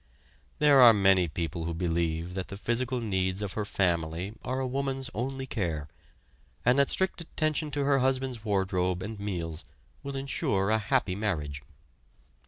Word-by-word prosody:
There 145 -2 +6
are 120 -2 +10
many 95 -3 +4
people 80 +1 -3
who 85 0 -3
believe 85 0 -1
that 95 -1 -4
the 100 - -7
physical 120 +4 -1
needs 95 -3 -1
of 100 - -4
her 105 - -2
family 85 0 0
are 130 +1 -2
a 130 - -1
woman's 135 +1 -2
only 135 +3 -3
care; 80 - -3 0.8
and 125 +3 +5
that 140 - +4
strict 190 -2 +1
attention 155 -2 -1
to 145 0 -1
her 140 0 +3
husband's 130 -3 0
wardrobe 95 -3 0
and 105 +1 -6
meals 85 -5 -3 0.4
will 140 -1 -6
insure 105 -7 0
a 110 - +3
happy 110 -2 +1
marriage. 80 -9 -2
105 Hz, 160 wpm, -29 LUFS, 90-130 Hz, 0.8 s, are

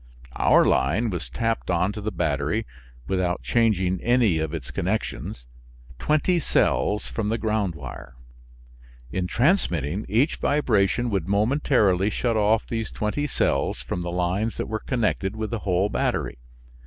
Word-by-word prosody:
Our - - +5
line 95 - +2
was 85 -8 -4
tapped 115 - -2
on 90 +2 +2
to 105 - -6
the 110 +1 -2
battery 80 +3 -1 0.4
(without 90 -2 -1
changing 95 -6 +1
any 120 -8 +3
of 80 -1 -2
its 80 -6 -6
connections) 90 - -3 0.5
twenty 155 - +2
cells 105 - +1
from 105 -2 -3
the 115 - 0
ground 105 -6 -1
wire. 65 -3 -9 1.0
In 90 +2 -1
transmitting, 100 - +1
each 120 - +2
vibration 120 -4 +1
would 95 -4 -1
momentarily 105 -3 +2
shut 115 +1 -1
off 110 +1 +2
these 115 -2 -3
twenty 125 +8 -2
cells 70 - 0
from 90 - -3
the 85 - -3
lines 90 +5 -1
that - - -2
were 110 0 -3
connected 110 -5 -1
with 110 0 -4
the 115 - -2
whole 95 0 +1
battery. - - -1
105 Hz, 145 wpm, -24 LUFS, 90-115 Hz, 1.0 s, Our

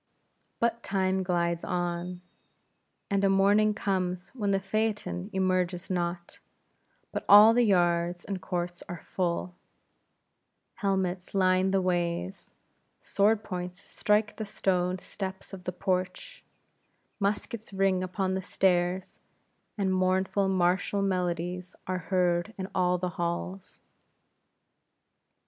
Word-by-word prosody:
But 235 0 +1
time 190 -2 0
glides 170 -2 0
on, 175 0 -3 0.9
and 200 0 +2
a 195 - +4
morning 205 +2 +4
comes, 185 -2 -2
when 210 -6 -3
the 195 -1 +2
phaeton 205 -1 -2
emerges 185 -2 0
not; 175 -1 -3 0.7
but - - -3
all 210 +2 +10
the 245 - +4
yards 175 -4 +2
and 195 -2 -4
courts 175 +1 -3
are 175 -2 -7
full; 180 0 -1 1.3
helmets 190 -2 -1
line 185 0 +3
the 190 -1 +2
ways; 175 +1 -2 0.4
sword 210 +2 +2
points 180 -2 -5
strike 210 +1 0
the 220 - -3
stone 185 -3 0
steps 190 +1 -7
of 180 -2 -9
the 180 - -1
porch; 185 - -3 0.8
muskets 210 +3 -2
ring 195 -1 +2
upon 185 +1 -1
the 190 - -1
stairs; 185 0 0 0.6
and 195 -2 +1
mournful 190 +1 +1
martial 185 +2 +1
melodies 180 -1 -2
are 185 0 -2
heard 180 +2 +1
in 190 -1 -4
all 180 -1 +2
the 180 0 -2
halls. 180 +2 -4
185 Hz, 115 wpm, -28 LUFS, 180-195 Hz, 1.3 s, all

